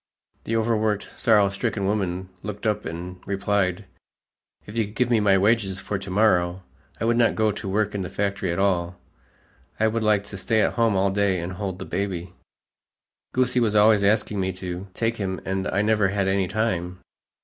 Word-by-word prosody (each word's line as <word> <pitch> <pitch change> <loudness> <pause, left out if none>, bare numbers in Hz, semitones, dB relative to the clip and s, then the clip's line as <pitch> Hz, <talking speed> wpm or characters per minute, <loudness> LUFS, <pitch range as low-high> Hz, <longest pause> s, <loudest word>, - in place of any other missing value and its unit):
The 115 - -1
overworked, 110 -2 0
sorrow 105 -4 +4
stricken 100 -1 -2
woman 95 -2 -1
looked 105 +1 -6
up 105 -1 0
and 90 +2 -6
replied, 100 -1 0 0.8
"If 105 - -10
you 115 -2 +1
could 105 +2 -12
give 125 +1 +1
me 115 - +4
my 100 -2 +4
wages 100 -1 +2
for 100 0 -3
to 100 0 -8
morrow, 95 -3 +2 0.4
I - - -1
would 115 0 +2
not 115 -1 +3
go 110 -1 +2
to 100 -1 -6
work 105 +1 0
in 100 - -2
the 90 - -4
factory 100 -2 -2
at 85 - -2
all. 90 -3 0 0.8
I 110 - +3
would 110 +1 +1
like 105 -2 +2
to 100 -1 -8
stay 110 +2 +1
at - - +1
home 115 -3 +2
all 95 +1 +2
day 100 -2 +1
and 85 +2 -4
hold 95 -1 -4
the - - -7
baby. 90 -2 -3 1.0
Goosie 125 -1 +2
was 110 -2 +1
always 105 0 +5
asking 105 0 +2
me 95 0 0
to 90 +1 -6
take 115 0 -1
him 95 -2 -3
and 95 0 -2
I 100 +2 +1
never 105 -2 +3
had 100 0 0
any 95 -1 +1
time." 90 -3 -1
100 Hz, 195 wpm, -24 LUFS, 95-110 Hz, 1.0 s, always